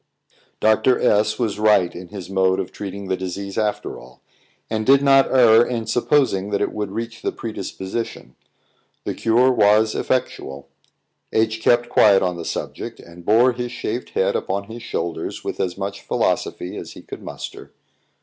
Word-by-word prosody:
Dr. 110 Hz, +3 st, +3 dB
S 105 Hz, +1 st, +2 dB
was 110 Hz, -4 st, -2 dB
right 105 Hz, -5 st, +4 dB
in 90 Hz, 0 st, -9 dB
his 100 Hz, -1 st, -8 dB
mode 95 Hz, -1 st, +2 dB
of -, -, -4 dB
treating 100 Hz, -1 st, -7 dB
the 95 Hz, -, 0 dB
disease 95 Hz, +2 st, -5 dB
after 105 Hz, -1 st, -2 dB
all, 65 Hz, +1 st, -16 dB, 0.5 s
and 110 Hz, -1 st, -2 dB
did 135 Hz, +4 st, +5 dB
not 135 Hz, -1 st, +5 dB
err 120 Hz, -3 st, +6 dB
in 120 Hz, -2 st, -3 dB
supposing 120 Hz, -4 st, +1 dB
that 100 Hz, -1 st, 0 dB
it -, -, 0 dB
would 105 Hz, -2 st, -3 dB
reach 115 Hz, +3 st, -5 dB
the -, -, -1 dB
predisposition. 105 Hz, 0 st, -6 dB, 0.7 s
The -, -, -3 dB
cure 120 Hz, +3 st, +3 dB
was 110 Hz, -1 st, +4 dB
effectual. 70 Hz, -, -2 dB, 0.6 s
H 110 Hz, 0 st, +1 dB
kept 120 Hz, +1 st, +3 dB
quiet 100 Hz, -5 st, +5 dB
on 90 Hz, -1 st, 0 dB
the 85 Hz, -1 st, -7 dB
subject, -, -, -5 dB
and 85 Hz, +1 st, -13 dB
bore 115 Hz, +7 st, +5 dB
his 120 Hz, 0 st, -5 dB
shaved 125 Hz, 0 st, -4 dB
head 95 Hz, -, +2 dB
upon 100 Hz, +1 st, -2 dB
his 115 Hz, +3 st, -10 dB
shoulders 85 Hz, -7 st, -4 dB
with -, -, -5 dB
as 90 Hz, -1 st, -2 dB
much 100 Hz, 0 st, -4 dB
philosophy 90 Hz, -, -1 dB
as -, -, -8 dB
he -, -, -12 dB
could -, -, -9 dB
muster. -, -, -8 dB
105 Hz, 170 wpm, -21 LUFS, 95-120 Hz, 0.7 s, err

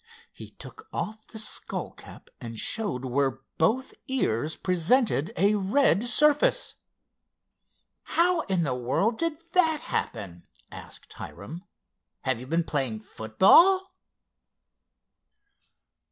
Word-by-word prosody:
He -, -, -11 dB
took -, -, -12 dB
off 215 Hz, 0 st, -5 dB
the 220 Hz, -, -10 dB
skull 215 Hz, 0 st, -2 dB
cap -, -, -15 dB
and 115 Hz, -1 st, -8 dB
showed 200 Hz, -, -2 dB
where 135 Hz, 0 st, -1 dB, 0.2 s
both 230 Hz, +11 st, +1 dB
ears 155 Hz, -, -1 dB
presented 185 Hz, -, +1 dB
a 200 Hz, +4 st, +3 dB
red 210 Hz, +3 st, +2 dB
surface. 300 Hz, -, +3 dB, 1.4 s
"How 345 Hz, 0 st, +3 dB
in 185 Hz, -3 st, +1 dB
the 135 Hz, -5 st, -1 dB
world 130 Hz, -, -1 dB
did 330 Hz, -1 st, +1 dB, 0.2 s
that 320 Hz, -4 st, +3 dB
happen?" 90 Hz, -6 st, -4 dB, 0.2 s
asked -, -, -11 dB
Hiram. 170 Hz, +5 st, -9 dB, 0.6 s
"Have 130 Hz, -3 st, -1 dB
you 125 Hz, -, -9 dB
been 165 Hz, +3 st, +1 dB
playing 130 Hz, -9 st, -2 dB
football?" 340 Hz, -, +4 dB
190 Hz, 110 wpm, -26 LUFS, -, 1.4 s, football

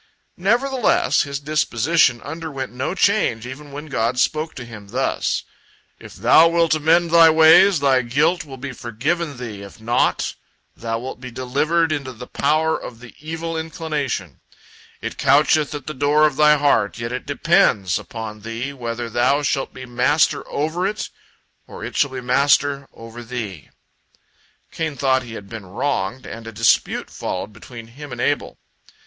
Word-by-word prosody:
Nevertheless, 245 Hz, +6 st, +2 dB
his 140 Hz, -2 st, -3 dB
disposition 145 Hz, -2 st, +1 dB
underwent 145 Hz, -3 st, -6 dB
no 130 Hz, +8 st, -3 dB
change, 190 Hz, -, +2 dB
even 140 Hz, +3 st, -9 dB
when 145 Hz, +2 st, -7 dB
God 125 Hz, -4 st, -1 dB
spoke 155 Hz, +5 st, 0 dB
to 125 Hz, -, -7 dB
him 105 Hz, -3 st, -11 dB
thus: 125 Hz, +6 st, -1 dB, 0.6 s
"If -, -, -12 dB
thou 120 Hz, -, +6 dB
wilt 170 Hz, -1 st, +2 dB
amend 165 Hz, +2 st, +3 dB
thy 165 Hz, -1 st, +8 dB
ways, 160 Hz, +2 st, +6 dB
thy 135 Hz, -2 st, +4 dB
guilt 150 Hz, +9 st, +1 dB
will 135 Hz, -3 st, -10 dB
be 135 Hz, +2 st, -6 dB
forgiven 140 Hz, +6 st, -3 dB
thee; 110 Hz, -5 st, -7 dB
if 100 Hz, +3 st, -12 dB
not, 120 Hz, +3 st, 0 dB, 0.4 s
thou 115 Hz, -1 st, -3 dB
wilt 125 Hz, +1 st, -7 dB
be 130 Hz, -, -7 dB
delivered 145 Hz, +7 st, 0 dB
into 140 Hz, -4 st, -3 dB
the 125 Hz, +1 st, -9 dB
power 155 Hz, +5 st, +1 dB
of 115 Hz, -, -8 dB
the 120 Hz, -1 st, -13 dB
evil 165 Hz, +2 st, -5 dB
inclination. 150 Hz, -, -4 dB, 0.6 s
It -, -, -6 dB
coucheth 150 Hz, +1 st, +3 dB
at 145 Hz, -, -7 dB
the 155 Hz, -, -5 dB
door 145 Hz, +2 st, +3 dB
of 150 Hz, -3 st, +1 dB
thy 150 Hz, +1 st, +5 dB
heart, 145 Hz, 0 st, +2 dB
yet 115 Hz, 0 st, -4 dB
it 125 Hz, +2 st, -5 dB
depends 145 Hz, -, +2 dB
upon 110 Hz, -2 st, -8 dB
thee 115 Hz, +5 st, -5 dB
whether 120 Hz, -2 st, -4 dB
thou 125 Hz, +5 st, +1 dB
shalt 135 Hz, -1 st, -1 dB
be 130 Hz, 0 st, -9 dB
master 125 Hz, +5 st, +2 dB
over 160 Hz, +6 st, -1 dB
it, 210 Hz, +1 st, -4 dB, 0.6 s
or -, -, -10 dB
it -, -, -7 dB
shall 140 Hz, -, +2 dB
be 130 Hz, -1 st, -6 dB
master 140 Hz, +2 st, +2 dB
over 115 Hz, +1 st, -11 dB
thee." 110 Hz, -, -6 dB, 1.0 s
Cain 160 Hz, -3 st, -3 dB
thought 130 Hz, -1 st, +2 dB
he 120 Hz, -3 st, -9 dB
had 100 Hz, -, -9 dB
been 110 Hz, -3 st, -9 dB
wronged, 115 Hz, +2 st, -2 dB
and 115 Hz, 0 st, -8 dB
a -, -, -6 dB
dispute 115 Hz, +1 st, +1 dB
followed 100 Hz, +3 st, -5 dB
between 115 Hz, +2 st, -11 dB
him 140 Hz, +5 st, -11 dB
and 120 Hz, -, -7 dB
Abel. -, -, -1 dB
135 Hz, 165 wpm, -21 LUFS, 120-155 Hz, 1.0 s, thy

